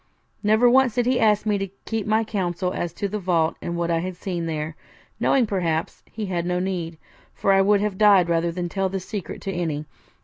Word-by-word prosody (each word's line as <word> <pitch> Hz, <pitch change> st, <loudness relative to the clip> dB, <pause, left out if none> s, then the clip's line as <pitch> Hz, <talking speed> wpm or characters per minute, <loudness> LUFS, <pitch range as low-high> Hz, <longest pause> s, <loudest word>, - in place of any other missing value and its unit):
Never 220 Hz, +3 st, +4 dB
once 255 Hz, -1 st, +4 dB
did 245 Hz, -1 st, +1 dB
he 250 Hz, 0 st, +2 dB
ask 210 Hz, -1 st, +3 dB
me 210 Hz, -2 st, +1 dB
to 195 Hz, -, -2 dB, 0.2 s
keep 225 Hz, -2 st, -2 dB
my 220 Hz, +1 st, +3 dB
counsel 185 Hz, -4 st, -2 dB
as 175 Hz, -, -3 dB
to 200 Hz, -, -2 dB
the 210 Hz, +2 st, -3 dB
vault 170 Hz, -4 st, +1 dB
and 170 Hz, 0 st, -3 dB
what 170 Hz, 0 st, -1 dB
I 165 Hz, -, +2 dB
had 185 Hz, +2 st, -4 dB
seen 175 Hz, -2 st, -4 dB
there, 155 Hz, -1 st, -3 dB, 0.4 s
knowing, 265 Hz, -3 st, +3 dB
perhaps, 170 Hz, -6 st, -2 dB
he 215 Hz, -1 st, -4 dB
had 180 Hz, -3 st, -2 dB
no 180 Hz, 0 st, 0 dB
need, 175 Hz, -3 st, -3 dB, 0.4 s
for 195 Hz, -, +2 dB
I 195 Hz, -, +5 dB
would 200 Hz, +1 st, +3 dB
have 205 Hz, -2 st, -2 dB
died 200 Hz, -4 st, +6 dB
rather 170 Hz, 0 st, +1 dB
than 175 Hz, +1 st, -3 dB
tell 195 Hz, +2 st, -1 dB
the 195 Hz, +1 st, -3 dB
secret 190 Hz, -1 st, -6 dB
to 195 Hz, -, -3 dB
any. 160 Hz, -4 st, -2 dB
190 Hz, 225 wpm, -23 LUFS, 170-210 Hz, 0.4 s, died